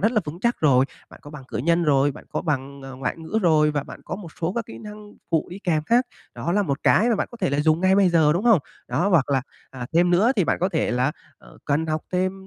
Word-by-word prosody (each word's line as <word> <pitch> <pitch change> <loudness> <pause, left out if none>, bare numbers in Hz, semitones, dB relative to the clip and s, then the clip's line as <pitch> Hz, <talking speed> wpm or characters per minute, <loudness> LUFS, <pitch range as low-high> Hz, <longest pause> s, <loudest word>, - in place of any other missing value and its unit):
rất 220 +4 +2
là 215 - +2
vững 155 +4 -7
chắc 235 +3 +1
rồi. 135 -4 +4 0.3
Bạn - - -15
có 145 - -11
bằng 150 -3 -10
cử - - -5
nhân 170 +6 +2
rồi, 145 -1 +3
bạn - - -13
có - - -3
bằng, 140 -3 -3
ờ, 135 -1 -9
ngoại 130 -1 -3
ngữ 165 +7 -2
rồi, 155 -3 +4
và 145 -2 -2
bạn - - -11
có - - -5
một 195 -4 -9
số 170 +2 -1
các 230 +1 -3
kỹ - - -10
năng 210 -1 -11 0.2
phụ 160 -2 +1
đi 180 - -7
kèm 160 -4 +1
khác. 240 +2 +3 0.3
Đó 170 - -3
là 205 +2 +2
một 140 -6 -3
cái 230 - +4
mà 230 - +2
bạn - - -2
có 240 - -10
thể 230 - -1
là 140 +1 +1
dùng 155 +2 +2
ngay 190 +1 +4
bây 195 -2 +5
giờ, 160 -3 +4
đúng 175 +7 -2
không? 230 -5 +6 0.3
Đó, 155 +11 0
hoặc 160 -8 +2
là, 135 -2 +1 0.3
à, 125 -2 -7
thêm 175 +2 +3
nữa 180 +5 +4
á, 250 - +4
thì 190 - +3
bạn - - 0
có 185 - +2
thể 160 -5 -1
là, 125 +4 +1 0.3
ờ, - - -18
cần 150 +2 0
học 155 0 -1
thêm 185 +1 +1
165 Hz, 295 wpm, -23 LUFS, 145-195 Hz, 0.3 s, không